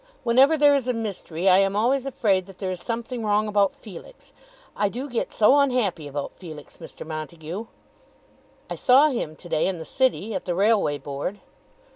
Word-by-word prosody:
Whenever 265 Hz, +7 st, +4 dB
there 290 Hz, -1 st, +5 dB
is 270 Hz, -3 st, 0 dB
a 250 Hz, -, 0 dB
mystery 195 Hz, -5 st, -4 dB
I 185 Hz, 0 st, +7 dB
am 195 Hz, 0 st, +2 dB
always 255 Hz, +5 st, +1 dB
afraid 195 Hz, -8 st, 0 dB
that 195 Hz, -2 st, -13 dB
there 190 Hz, -2 st, -3 dB
is 180 Hz, -, -5 dB
something 235 Hz, 0 st, -4 dB
wrong 210 Hz, 0 st, +1 dB
about 205 Hz, -2 st, +2 dB
Felix. 220 Hz, -, -13 dB, 0.4 s
I 205 Hz, -, +1 dB
do 255 Hz, +7 st, -5 dB
get 240 Hz, -4 st, -3 dB
so 225 Hz, +6 st, +4 dB
unhappy 235 Hz, -, 0 dB
about 145 Hz, 0 st, -5 dB
Felix, 155 Hz, -5 st, -11 dB
Mr. -, -, -10 dB
Montague." 160 Hz, +6 st, -6 dB, 1.0 s
"I -, -, -5 dB
saw 270 Hz, +4 st, +5 dB
him 235 Hz, -, -3 dB
to 175 Hz, -, -12 dB
day 155 Hz, -, +1 dB
in 190 Hz, -2 st, -2 dB
the 160 Hz, -, -8 dB
city, 225 Hz, -, 0 dB
at -, -, -4 dB
the 175 Hz, -, -2 dB
Railway 200 Hz, -6 st, +2 dB
Board." 145 Hz, +8 st, -5 dB
205 Hz, 185 wpm, -24 LUFS, 175-245 Hz, 1.0 s, I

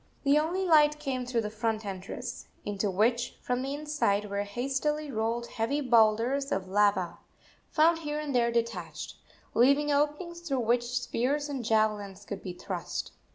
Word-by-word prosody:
The 285 Hz, +1 st, +5 dB
only 350 Hz, +5 st, 0 dB
light 300 Hz, -3 st, +5 dB
came 260 Hz, -4 st, -3 dB
through 240 Hz, -2 st, +1 dB
the 210 Hz, -1 st, -4 dB
front 220 Hz, 0 st, -2 dB
entrance, 190 Hz, -1 st, -6 dB, 0.2 s
into 205 Hz, 0 st, -1 dB
which, 230 Hz, +5 st, +1 dB
from 250 Hz, 0 st, -1 dB
the 270 Hz, +2 st, -3 dB
inside, 285 Hz, -10 st, 0 dB
were 200 Hz, 0 st, 0 dB
hastily 275 Hz, +8 st, -2 dB
rolled 230 Hz, +1 st, -1 dB
heavy 235 Hz, +6 st, -1 dB
boulders 240 Hz, +2 st, +3 dB
of 190 Hz, 0 st, -1 dB
lava, 200 Hz, -2 st, +2 dB, 0.5 s
found 325 Hz, +1 st, +4 dB
here 300 Hz, -2 st, -3 dB
and 300 Hz, -2 st, -3 dB
there 235 Hz, -1 st, +3 dB
detached, 235 Hz, 0 st, -3 dB, 0.4 s
leaving 280 Hz, +5 st, +4 dB
openings 300 Hz, +4 st, 0 dB
through 280 Hz, -7 st, -1 dB
which 240 Hz, +1 st, +2 dB
spears 285 Hz, +6 st, -1 dB
and 270 Hz, -4 st, -3 dB
javelins 210 Hz, -3 st, 0 dB
could 200 Hz, -2 st, -6 dB
be 185 Hz, -, -6 dB
thrust. 180 Hz, 0 st, -5 dB
240 Hz, 155 wpm, -29 LUFS, 210-295 Hz, 0.5 s, The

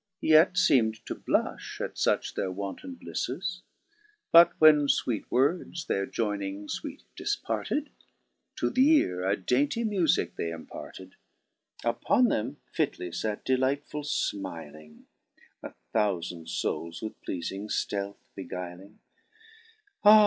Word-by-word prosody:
Yet 160 Hz, +3 st, +6 dB
feem'd 115 Hz, -11 st, +3 dB
to -, -, -3 dB
blufli -, -, -2 dB
at -, -, -3 dB
fuch -, -, +1 dB
their 95 Hz, -, -2 dB
wanton 100 Hz, -, -6 dB
blifles; -, -, -4 dB, 0.7 s
But 170 Hz, +1 st, +7 dB
when 150 Hz, -2 st, +7 dB
iweet 120 Hz, -5 st, 0 dB
words 165 Hz, +6 st, +1 dB
their 100 Hz, 0 st, -1 dB
joyning 100 Hz, -2 st, -2 dB, 0.2 s
(weet 285 Hz, -2 st, -7 dB
difparted, 300 Hz, 0 st, -2 dB, 0.7 s
To -, -, 0 dB
th' 255 Hz, -, -2 dB
eare 265 Hz, -, +4 dB
a 95 Hz, +2 st, +1 dB
dainty 140 Hz, -, +1 dB
mufique 195 Hz, -8 st, +1 dB
they 85 Hz, -, -2 dB
imparted: 85 Hz, +3 st, -9 dB, 0.7 s
Upon 170 Hz, -, +3 dB
them 125 Hz, +7 st, -1 dB, 0.2 s
fitly 135 Hz, -, -1 dB
fate, 105 Hz, +5 st, -3 dB
delightfuU 140 Hz, +3 st, 0 dB
fmiling, 75 Hz, -6 st, -9 dB, 0.6 s
A -, -, -9 dB, 0.2 s
thoufand 90 Hz, -5 st, -1 dB
foules 85 Hz, +4 st, -3 dB
with 110 Hz, -, -4 dB
pleafing 95 Hz, +3 st, -4 dB
ftealth 100 Hz, -1 st, -2 dB, 0.2 s
beguiling: 90 Hz, +3 st, -7 dB, 1.1 s
Ah 215 Hz, +1 st, +10 dB
110 Hz, 115 wpm, -28 LUFS, 95-155 Hz, 1.1 s, Ah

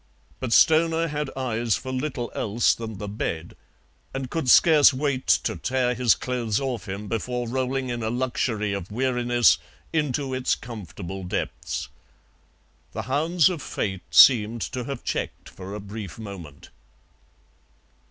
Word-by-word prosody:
But 130 Hz, -3 st, -4 dB
Stoner 165 Hz, +4 st, +4 dB
had 150 Hz, -1 st, -3 dB
eyes 120 Hz, -4 st, 0 dB
for 130 Hz, -, -5 dB
little 130 Hz, -2 st, -3 dB
else 110 Hz, +3 st, +2 dB
than 110 Hz, -3 st, -7 dB
the 105 Hz, -, -6 dB
bed, 85 Hz, -5 st, -4 dB, 0.6 s
and 135 Hz, -2 st, -4 dB
could 160 Hz, -6 st, -1 dB
scarce 150 Hz, +1 st, +7 dB
wait 135 Hz, -1 st, -2 dB, 0.2 s
to -, -, -1 dB
tear 125 Hz, -1 st, 0 dB
his 125 Hz, -2 st, +3 dB
clothes 120 Hz, -4 st, -1 dB
off 125 Hz, -7 st, -4 dB
him 100 Hz, +2 st, -5 dB
before 120 Hz, +2 st, -2 dB
rolling 130 Hz, +1 st, -1 dB
in 120 Hz, -1 st, -3 dB
a 110 Hz, -, -1 dB
luxury 120 Hz, -4 st, -1 dB
of 100 Hz, -2 st, -5 dB
weariness 120 Hz, -5 st, +3 dB, 0.3 s
into 145 Hz, -3 st, 0 dB
its 130 Hz, 0 st, +1 dB
comfortable 95 Hz, -4 st, -8 dB
depths. 90 Hz, -, -3 dB, 1.1 s
The -, -, -4 dB
hounds 160 Hz, +5 st, +2 dB
of 180 Hz, -5 st, -2 dB
Fate 95 Hz, -7 st, -3 dB
seemed 115 Hz, -2 st, +6 dB
to 125 Hz, -2 st, -3 dB
have 135 Hz, -2 st, -5 dB
checked -, -, -4 dB
for 95 Hz, +2 st, -8 dB
a -, -, -5 dB
brief 100 Hz, -2 st, -8 dB
moment. 95 Hz, -10 st, -10 dB
120 Hz, 140 wpm, -25 LUFS, 105-130 Hz, 1.1 s, scarce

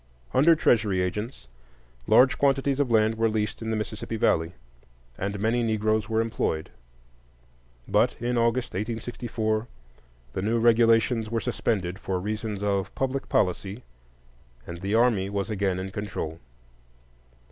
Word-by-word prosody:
Under 165 Hz, +5 st, +6 dB
Treasury 105 Hz, -10 st, +2 dB
agents, 105 Hz, -, -3 dB, 0.6 s
large 130 Hz, +1 st, +5 dB
quantities 135 Hz, 0 st, +2 dB
of 140 Hz, -3 st, +1 dB
land 110 Hz, 0 st, +2 dB
were 115 Hz, 0 st, +3 dB
leased 105 Hz, 0 st, -2 dB
in 110 Hz, -, -4 dB
the 110 Hz, -, 0 dB
Mississippi 110 Hz, +1 st, -4 dB
Valley, 80 Hz, -4 st, +1 dB, 0.6 s
and 100 Hz, +5 st, -3 dB
many 115 Hz, +4 st, +1 dB
Negroes 110 Hz, -1 st, 0 dB
were 110 Hz, 0 st, +2 dB
employed; 110 Hz, -8 st, -2 dB, 1.2 s
but -, -, +2 dB
in 120 Hz, +1 st, -1 dB
August, 115 Hz, +1 st, +1 dB
1864, 110 Hz, +1 st, -2 dB, 0.7 s
the 95 Hz, -, -2 dB
new 115 Hz, +4 st, +1 dB
regulations 115 Hz, 0 st, +3 dB
were 115 Hz, 0 st, 0 dB
suspended 95 Hz, -3 st, -2 dB
for 95 Hz, -1 st, -2 dB
reasons 105 Hz, +1 st, -4 dB
of 100 Hz, -2 st, -1 dB
"public 135 Hz, +1 st, -2 dB
policy," 100 Hz, +4 st, 0 dB, 0.8 s
and 85 Hz, 0 st, -8 dB
the 100 Hz, +3 st, -1 dB
army 110 Hz, -5 st, +3 dB
was 100 Hz, +2 st, -2 dB
again 100 Hz, -3 st, 0 dB
in 95 Hz, +1 st, -5 dB
control. 95 Hz, -6 st, -5 dB
110 Hz, 135 wpm, -26 LUFS, 100-115 Hz, 1.2 s, Under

